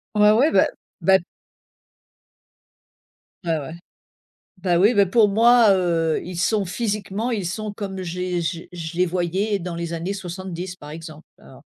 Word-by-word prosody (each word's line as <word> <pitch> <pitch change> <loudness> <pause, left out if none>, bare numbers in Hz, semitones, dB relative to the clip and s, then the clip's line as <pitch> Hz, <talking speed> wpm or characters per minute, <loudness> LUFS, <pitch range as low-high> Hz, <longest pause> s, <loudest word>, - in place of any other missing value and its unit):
Ouais, 210 0 +6
ouais, 270 +9 +4
bah - - +5 0.4
bah 190 0 +5 2.3
Ouais, 165 -1 +1
ouais. 145 +1 -6 0.9
Bah, 180 -2 +1
oui, 210 +7 +4
bah, 200 -1 +5
pour 210 +3 +4
moi, 230 +1 +5
heu, 165 -4 +1
ils 180 -1 -7
sont 205 +2 +1
physiquement 210 +3 -2
ils 205 -4 -2
sont 210 +3 -4
comme 195 -2 -6
j'ai 180 0 -3
j 170 0 -4
je 170 -2 -7
les 180 +1 +3
voyais 185 +4 -1
dans 175 -1 -5
les 170 0 -4
années 170 +3 -3
70 185 -1 -6
par 150 -4 -11
exemple, 155 0 -10
alors, - - -16
185 Hz, 155 wpm, -22 LUFS, 170-205 Hz, 2.3 s, Ouais